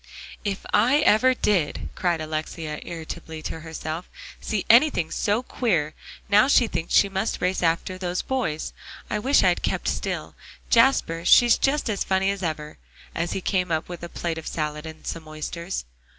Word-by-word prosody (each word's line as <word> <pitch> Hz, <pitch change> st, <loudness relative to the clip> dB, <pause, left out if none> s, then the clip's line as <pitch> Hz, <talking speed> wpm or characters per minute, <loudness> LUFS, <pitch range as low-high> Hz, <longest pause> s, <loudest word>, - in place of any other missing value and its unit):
"If 200 Hz, -2 st, -3 dB
I 250 Hz, +8 st, +4 dB
ever 255 Hz, 0 st, +4 dB
did!" 185 Hz, -11 st, 0 dB
cried 175 Hz, -3 st, 0 dB
Alexia 155 Hz, 0 st, -4 dB
irritably 160 Hz, -1 st, -7 dB
to -, -, -5 dB
herself, 160 Hz, +1 st, -6 dB, 0.3 s
"see 210 Hz, -3 st, -2 dB
anything 235 Hz, -, +5 dB
so 215 Hz, +3 st, 0 dB
queer! 170 Hz, -, 0 dB, 0.3 s
Now 210 Hz, +4 st, +5 dB
she 265 Hz, -3 st, +5 dB
thinks 165 Hz, -6 st, -2 dB
she 200 Hz, -, +6 dB
must 195 Hz, +3 st, -2 dB
race 185 Hz, +1 st, 0 dB
after 175 Hz, +2 st, 0 dB
those 180 Hz, -1 st, -2 dB
boys. 200 Hz, -13 st, -2 dB, 0.4 s
I 210 Hz, -, 0 dB
wish 265 Hz, +3 st, +3 dB
I'd 180 Hz, -2 st, +3 dB
kept -, -, -2 dB
still. -, -, -2 dB, 0.4 s
Jasper, 230 Hz, -9 st, +3 dB
she's 240 Hz, +6 st, +6 dB
just 285 Hz, +2 st, +1 dB
as 210 Hz, -3 st, -1 dB
funny 190 Hz, +1 st, +1 dB
as 200 Hz, -1 st, -5 dB
ever," 155 Hz, -3 st, -4 dB, 0.3 s
as 170 Hz, +1 st, -2 dB
he 195 Hz, -, -3 dB
came 180 Hz, -1 st, 0 dB
up 160 Hz, 0 st, 0 dB
with 175 Hz, -1 st, -7 dB
a 170 Hz, -, -6 dB
plate 165 Hz, -1 st, -3 dB
of 160 Hz, -, -9 dB
salad, 150 Hz, 0 st, -3 dB
and 160 Hz, 0 st, -11 dB
some 165 Hz, -2 st, -5 dB
oysters. 170 Hz, -, -5 dB
175 Hz, 170 wpm, -24 LUFS, 160-210 Hz, 0.4 s, she